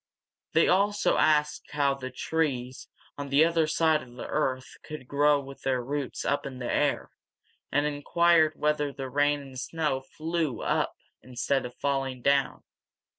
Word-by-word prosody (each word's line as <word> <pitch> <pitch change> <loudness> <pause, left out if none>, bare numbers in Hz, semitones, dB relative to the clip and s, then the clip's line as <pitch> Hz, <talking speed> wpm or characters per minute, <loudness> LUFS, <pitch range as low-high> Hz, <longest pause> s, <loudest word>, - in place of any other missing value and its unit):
They 165 - +4
also 205 +3 +2
asked 150 -1 +2
how 140 -2 +2
the 135 -1 -6
trees 130 -2 -2 0.3
on 140 -1 -5
the 140 +4 +5
other 165 -1 +2
side 155 0 +2
of 120 -1 -14
the 125 - -7
earth 130 -4 -2
could 155 -5 -9
grow 145 +1 +3
with 135 0 -10
their 130 -2 0
roots 140 +1 -4
up 140 - 0
in 130 -2 -7
the 125 -1 -3
air, - - 0 0.6
and 145 +1 +2
inquired 155 +2 +3
whether 150 -1 0
the 135 -1 -6
rain 145 +1 +2
and 135 -2 -9
snow 150 -2 -1
flew 155 -2 -3
up - - 0 0.3
instead 130 +1 -1
of 120 - -15
falling 135 -3 -2
down. 140 -1 +1
145 Hz, 160 wpm, -28 LUFS, 130-155 Hz, 0.6 s, the